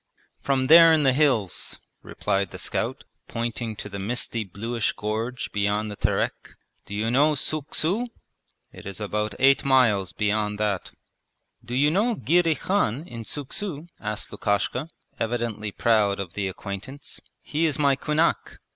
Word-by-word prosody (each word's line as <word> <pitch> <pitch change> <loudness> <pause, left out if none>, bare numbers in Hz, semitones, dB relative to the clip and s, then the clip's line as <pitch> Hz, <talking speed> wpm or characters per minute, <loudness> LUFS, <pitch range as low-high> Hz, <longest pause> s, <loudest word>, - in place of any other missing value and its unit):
'From 135 -2 +1
there 165 +3 +9
in 155 -2 +4
the 135 -2 +4
hills,' 130 - +1 0.2
replied 100 -1 -1
the - - -8
scout, - - -2 0.2
pointing 115 -1 -3
to 105 - -7
the 100 -1 -6
misty 115 +2 -1
bluish 115 +4 -2
gorge 110 +4 -3
beyond 105 +1 0
the - - -6
Terek. - - -1 0.3
'Do 100 - -6
you 110 +2 0
know 150 +4 +4
Suuk 150 0 -2
su? 200 +10 0 0.7
It - - -10
is 100 - -6
about 105 0 -2
eight 135 +1 +5
miles 115 -9 +3
beyond 105 0 0
that.' 105 -3 -1 0.7
'Do 120 +1 -5
you 145 +3 +4
know 220 +7 +2
Girey 165 - +3
Khan 160 - 0
in 115 -6 -7
Suuk 140 +5 -5
su?' 170 -7 -3
asked 105 0 -4
Lukashka, 125 +8 -1 0.3
evidently 115 -2 -2
proud 105 -3 +2
of 95 -4 -5
the 100 -2 -2
acquaintance. 100 +9 -7 0.2
'He 160 +2 0
is 150 - -1
my 140 -2 +3
kunak.' 155 +4 0
115 Hz, 155 wpm, -25 LUFS, 105-145 Hz, 0.7 s, there